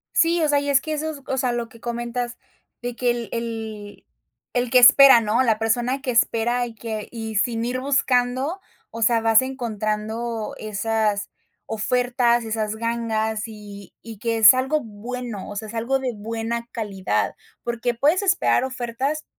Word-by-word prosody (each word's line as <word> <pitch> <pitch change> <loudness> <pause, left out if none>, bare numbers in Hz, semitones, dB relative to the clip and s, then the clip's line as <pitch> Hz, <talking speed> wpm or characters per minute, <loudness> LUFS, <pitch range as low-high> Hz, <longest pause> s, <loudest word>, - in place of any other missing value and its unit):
Sí, 335 +1 +3
o - - +3
sea, 290 -1 +3
y 285 0 -3
es 275 -1 +4
que 315 - -4
eso 310 +1 -2
es 290 -3 -10
o 265 - -2
sea, 255 -1 +1
lo 235 -1 -3
que 235 -2 -16
comentas, 240 +1 -4 0.4
de 245 -1 -4
que 245 0 +1
el 240 -1 -4
el 220 -3 -6 0.5
el 245 -1 0
que 255 - +6
espera, 265 -1 +9
¿no? 220 +3 +1
La 225 -4 +2
persona 240 +4 0
que 265 -3 -2
espera, 240 +1 +1
y 235 -1 -9
que 220 -2 -5
y 225 -2 -6
sin 225 +2 0
ir 245 +2 -2
buscando, 265 +3 +1 0.3
o 230 - -8
sea, 230 0 +3
vas 225 0 +5
encontrando 225 -2 -3
esas 215 -1 -1 0.4
ofertas, 240 +1 +1
esas 220 -1 -2
gangas, 220 -1 -1
y 205 -3 -11
y 225 -1 -10
que 230 +1 -1
es 220 0 +9
algo 265 +4 0
bueno, 230 -1 -7
o 205 - -7
sea, 215 +1 -5
es - - -9
algo 240 +4 0
de 260 -1 -2
buena 225 +2 -4
calidad, 200 -5 -2 0.3
porque 240 0 -1
puedes 295 - +2
esperar 385 -9 +2
ofertas 260 +4 -3
235 Hz, 175 wpm, -23 LUFS, 220-255 Hz, 0.5 s, espera